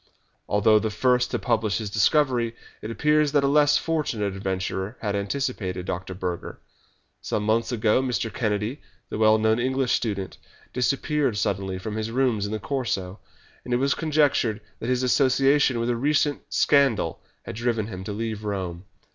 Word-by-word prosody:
Although 105 +1 +4
the 110 - -1
first 125 +2 +2
to - - -1
publish 105 -4 0
his 105 -3 -4
discovery, 120 0 +2 0.3
it 110 - -6
appears 150 +4 +2
that 145 -2 +3
a - - +3
less 145 +1 +4
fortunate 120 - -1
adventurer 95 +2 -3
had 105 -4 -2
anticipated 100 -4 -2
Dr. 90 +1 -4
Burger. 90 -2 -5 0.6
Some 105 - -2
months 115 +3 +1
ago 110 +1 +2
Mr. 120 -4 -2
Kennedy, 105 +3 -2 0.3
the - - -4
well 110 0 +5
known 110 +1 +2
English 130 +1 0
student, 100 -5 -2 0.3
disappeared 135 -1 0
suddenly 95 -1 -1
from 110 +3 -5
his 110 0 -2
rooms 115 -4 +1
in - - -6
the 110 - -1
Corso, 105 -7 -3 0.4
and 125 - -1
it - - +3
was 135 +1 +2
conjectured 145 -8 +1 0.2
that 115 - -4
his 125 0 +1
association 135 0 +3
with 120 +1 0
a - - 0
recent 145 +3 +1
scandal 135 - +2 0.2
had - - -6
driven 115 -2 -1
him 95 -4 -7
to 105 - -4
leave 110 0 -4
Rome. 95 -4 -4
115 Hz, 165 wpm, -25 LUFS, 105-130 Hz, 0.6 s, well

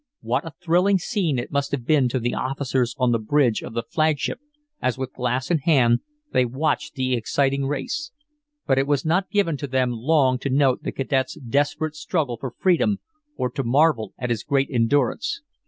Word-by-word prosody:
What - - -1
a 160 - -8
thrilling 180 +3 +3
scene 180 - -1
it 120 - -4
must 140 0 0
have 135 -4 -3
been 140 -4 +3
to 130 - -1
the 120 +1 -1
officers 130 -2 -1
on 125 -2 +2
the 115 - +2
bridge 120 0 +2
of 115 - -8
the 115 - -1
flagship 155 - 0 0.4
as 130 0 0
with 130 -1 -5
glass 125 +3 -1
in 165 - +3
hand 130 -6 +4 0.3
they 130 - +3
watched 140 +5 -1
the 130 -2 0
exciting 135 +3 0
race. 145 - -3 0.6
But 135 0 +3
it 135 - 0
was 145 -1 +1
not 180 +4 +1
given 185 -8 +1
to 145 - -5
them 130 -1 +1
long 130 +1 +2
to 140 - -3
note 135 -1 +2
the - - -3
cadet's 135 -1 -1
desperate 145 +4 0
struggle 150 -5 -2
for 130 +3 -5
freedom, 190 +3 +2 0.4
or 125 - 0
to 135 +1 -3
marvel 130 -4 +2
at 125 -1 -3
his 115 - -1
great 135 -1 +1
endurance. 145 - +1
135 Hz, 190 wpm, -23 LUFS, 125-155 Hz, 0.6 s, hand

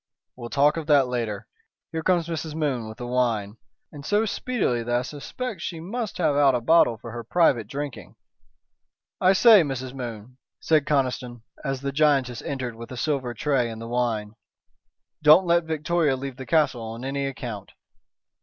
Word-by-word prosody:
"We'll 120 -2 -8
talk 145 +4 +3
of 160 -2 -5
that 145 -4 +5
later. 115 -5 -3 0.4
Here 160 - -3
comes 175 -1 +1
Mrs. 160 -2 -4
Moon 135 -8 -1
with 110 - -10
the 120 - -6
wine, 115 -4 -1 0.3
and 145 -1 -10
so 210 +7 +1
speedily 210 - -1
that 120 +1 -1
I 120 - +2
suspect 170 - -6
she 170 -2 -5
must 220 +7 -4
have 155 -5 +1
out 140 -2 +4
a - - +1
bottle 120 -2 +4
for 115 +1 -9
her 120 0 -6
private 120 - +2
drinking. 135 -7 -6 1.0
I 185 +1 +5
say, 215 0 +7
Mrs. 130 -4 -4
Moon," 120 -1 -8 0.2
said 155 -3 +2
Conniston, 125 -4 -1 0.2
as 135 -2 -3
the 140 0 -2
giantess 135 -4 +2
entered 130 -4 -4
with 115 +2 -10
a 125 - -7
silver 130 -4 -1
tray 135 -5 0
and 110 -1 -7
the 115 - -7
wine, 115 -3 -1 0.9
"don't 155 +5 +7
let 170 -1 +2
Victoria 160 -2 0
leave 135 -1 -6
the 130 - -8
castle 150 -7 +2
on 115 +3 -6
any 140 +1 -2
account." 120 -7 -7
135 Hz, 175 wpm, -25 LUFS, 120-155 Hz, 1.0 s, say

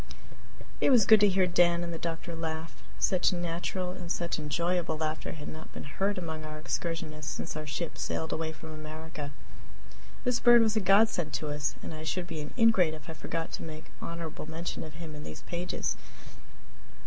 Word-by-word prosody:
It - - +5
was 240 -7 +7
good 220 +1 +9
to 205 - +7
hear 190 -1 +4
Dan 175 -1 +4
and 170 0 -3
the 165 - -4
doctor 170 0 -3
laugh 160 -6 -4 0.2
such 185 -2 +3
natural 175 +1 -2
and 175 -1 -5
such 170 -2 -1
enjoyable 170 +2 0
laughter 155 0 -2
had 150 -2 -7
not 155 0 -8
been - - -6
heard 195 +8 0
among 160 -3 -4
our 155 0 -6
excursionists 155 -2 -3
since - - -4
our 155 0 -4
ship 160 +3 -3
sailed 160 - -1
away 160 0 -1
from 160 0 -9
America. 155 -1 -6 0.9
This 245 -1 +2
bird 240 -1 +8
was 220 -1 +2
a - - +4
godsend 195 -4 +4
to 155 - -1
us, 145 -2 -1
and - - -5
I 155 0 -6
should 175 +3 -1
be 165 -3 -4
an 150 - -6
ingrate 195 -9 +5
if 155 +1 -9
I - - -5
forgot 165 +1 -4
to - - -4
make 155 -1 -8
honorable 165 -2 -5
mention 165 +2 -4
of 155 -1 -9
him 165 -1 -7
in 150 0 -7
these 75 - -8
pages. 175 +1 -2
165 Hz, 195 wpm, -30 LUFS, 155-180 Hz, 0.9 s, good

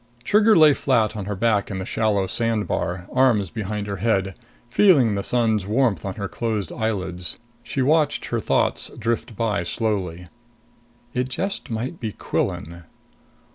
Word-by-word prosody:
Trigger 215 +1 +5
lay 155 -3 +7
flat 115 -6 +1
on 105 -3 -4
her 105 0 -3
back 105 0 +1
in 95 - -4
the 95 - -4
shallow 105 -2 +1
sand 115 +2 -1
bar, 90 0 -2
arms 120 -9 +3
behind 105 -1 -3
her 100 -1 -4
head, 95 -2 0 0.3
feeling 135 - +4
the 100 - -1
sun's 110 -4 +1
warmth 110 - +1
on 95 - -4
her 100 -2 -4
closed 105 +1 -3
eyelids. 95 -6 -3 0.2
She 130 +2 -2
watched 150 +1 +2
her 120 - -1
thoughts - - +1
drifting 115 0 -2
by 105 -3 0
slowly. 90 -2 -2 0.9
It 125 +1 -1
just 195 +9 -3
might 120 +8 -4
be 110 -3 -4
Quillan. 85 +2 -3
110 Hz, 155 wpm, -23 LUFS, 95-120 Hz, 0.9 s, lay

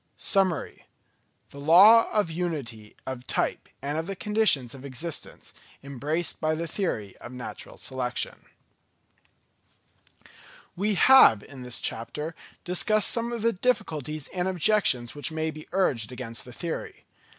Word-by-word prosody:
Summary: 190 -6 0 0.6
the 140 - -11
Law 195 +10 +7
of 205 -6 +1
Unity 140 -11 -5
of 130 -1 -6
Type - - -1
and 145 +3 -2
of 165 - -5
the 195 - -4
Conditions 210 - +2
of 135 -1 -11
Existence 140 +4 -5 0.3
embraced 145 +5 -3
by 155 0 +1
the 165 +2 -3
Theory 115 - -3
of 120 - -10
Natural 125 -1 -9
Selection. 125 -2 -3 2.3
We 205 +3 0
have 185 - +7
in 135 -3 -12
this 125 -1 -4
chapter 150 +8 -4 0.3
discussed 210 +4 +2
some 235 0 -1
of 235 -2 -4
the 230 0 +3
difficulties 155 - -2
and 180 0 -2
objections 180 - +2
which 145 +2 -3
may 160 0 -2
be 155 0 -11
urged 135 - 0
against 120 -2 -6
the 125 - -11
theory. 165 +6 -6
155 Hz, 135 wpm, -26 LUFS, 130-190 Hz, 2.3 s, Law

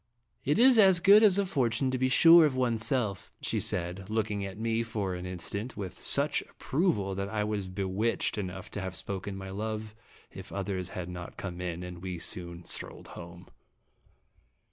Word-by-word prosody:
"It 145 - +1
is 245 0 +7
as 190 -4 +7
good 200 +4 +7
as 205 -4 +6
a 200 - +2
fortune 130 - 0
to 130 - -1
be 130 0 +2
sure 165 +5 +8
of 145 -4 +2
one's 120 -3 0
self," 110 -9 -2
she - - -1
said, 90 +3 -3
looking 110 -2 -1
at 95 0 -6
me 115 +1 0
for 105 -5 -3
an 90 0 -5
in 90 0 -5
stant 100 +7 -4
with 95 -4 -6
such - - +3
approval 135 - -1
that 100 +1 -3
I 110 -1 -1
was 105 -2 -2
bewitched 95 +4 -1
enough 95 -1 -6
to 105 - -5
have 95 -1 -5
spoken 95 +2 -4
my 95 0 -7
love 110 +1 -4 0.4
if - - -10
others 95 -2 -3
had 90 -1 -4
not 90 -1 -8
come 90 -2 -6
in, 90 -1 -4
and 90 -1 -8
we 90 -1 -5
soon 85 +1 -6
strolled - - -3
home. 85 0 -11
100 Hz, 190 wpm, -29 LUFS, 90-120 Hz, 0.4 s, sure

